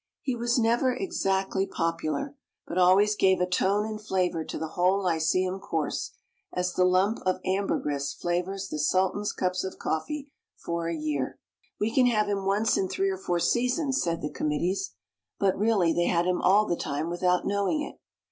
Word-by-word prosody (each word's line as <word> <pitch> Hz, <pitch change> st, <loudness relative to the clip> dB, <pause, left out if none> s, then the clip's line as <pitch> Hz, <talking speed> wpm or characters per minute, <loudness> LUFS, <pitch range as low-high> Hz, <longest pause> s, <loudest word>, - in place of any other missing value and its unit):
He 260 Hz, -3 st, -1 dB
was 240 Hz, +1 st, 0 dB
never 240 Hz, +2 st, +2 dB
exactly 195 Hz, -, -1 dB
popular, 165 Hz, -, -2 dB, 0.3 s
but 180 Hz, -, -2 dB
always 195 Hz, +4 st, +5 dB
gave 190 Hz, -2 st, +3 dB
a 180 Hz, -, +2 dB
tone 195 Hz, +3 st, +1 dB
and 215 Hz, -1 st, -5 dB
flavor 180 Hz, -5 st, 0 dB
to -, -, -6 dB
the 160 Hz, -, -4 dB
whole 185 Hz, +4 st, +2 dB
lyceum 185 Hz, +2 st, +1 dB
course, 165 Hz, -6 st, -2 dB, 0.4 s
as 180 Hz, 0 st, -1 dB
the 180 Hz, -, +3 dB
lump 185 Hz, +5 st, +2 dB
of 185 Hz, 0 st, 0 dB
ambergris 150 Hz, -7 st, -1 dB
flavors 180 Hz, +5 st, -2 dB
the 155 Hz, -, -4 dB
Sultan's 190 Hz, +6 st, +1 dB
cups 185 Hz, -1 st, -1 dB
of 190 Hz, -, -5 dB
coffee 285 Hz, -, -3 dB, 0.3 s
for 170 Hz, 0 st, -3 dB
a 170 Hz, -, -2 dB
year. 150 Hz, -4 st, -2 dB, 0.4 s
"We 220 Hz, +2 st, 0 dB
can 255 Hz, -2 st, +5 dB
have 215 Hz, -3 st, +2 dB
him 200 Hz, -1 st, -1 dB
once 210 Hz, +4 st, +2 dB
in 190 Hz, -, +1 dB
three 195 Hz, +1 st, 0 dB
or 190 Hz, -, -3 dB
four 175 Hz, -2 st, -1 dB
seasons," 255 Hz, -, +1 dB
said 165 Hz, -1 st, -2 dB
the 150 Hz, -, -3 dB
committees. 155 Hz, -, -1 dB, 0.4 s
But 195 Hz, -2 st, +2 dB
really 200 Hz, -6 st, +2 dB
they 175 Hz, -, +1 dB
had 170 Hz, -1 st, +2 dB
him 180 Hz, 0 st, 0 dB
all 205 Hz, +3 st, +5 dB
the 175 Hz, -, 0 dB
time 145 Hz, 0 st, -3 dB
without 180 Hz, +1 st, +1 dB
knowing 200 Hz, +10 st, 0 dB
it. -, -, -9 dB
190 Hz, 180 wpm, -27 LUFS, 175-210 Hz, 0.4 s, always